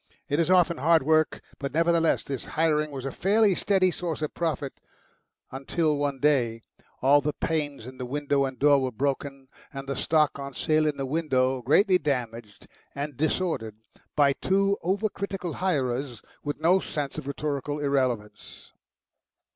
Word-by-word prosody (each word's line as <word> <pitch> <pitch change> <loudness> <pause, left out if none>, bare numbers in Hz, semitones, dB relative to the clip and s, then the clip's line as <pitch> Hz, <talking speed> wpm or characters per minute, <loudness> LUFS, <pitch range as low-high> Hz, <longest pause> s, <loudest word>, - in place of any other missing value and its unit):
It 145 - 0
was 165 - +1
often 180 -2 +4
hard 160 +2 +3
work, 155 +2 +2 0.2
but 140 +1 -5
nevertheless 165 0 +2
this 135 -3 -4
hiring 155 -1 +2
was 135 -2 -7
a 135 - -2
fairly 205 +4 +3
steady 185 0 +2
source 170 -3 -4
of 155 - -3
profit, 150 -5 -2 0.8
until 150 +4 0
one 145 -2 -2
day 120 -6 +1 0.4
all 145 +2 +6
the 150 0 -1
panes 145 -7 -3
in 130 +1 -11
the 125 - -3
window 140 +1 0
and 130 -1 -5
door 145 -1 +4
were 130 -1 -1
broken 135 +2 -3 0.2
and 135 0 -7
the 140 - -2
stock 150 +1 +1
on 140 -1 -7
sale 155 0 +2
in 150 - -1
the 135 - -2
window 130 -3 0
greatly 180 - +4
damaged 120 - -4 0.3
and 145 0 -4
disordered 155 - -1 0.4
by 140 -2 +4
two 195 +5 +1
over 195 +5 0
critical 195 -4 -5
hirers 135 -8 -2 0.2
with 145 0 -4
no 175 +4 +4
sense 145 -6 -4
of - - -9
rhetorical 145 0 -3
irrelevance. 130 -7 -2
145 Hz, 160 wpm, -26 LUFS, 135-165 Hz, 0.8 s, all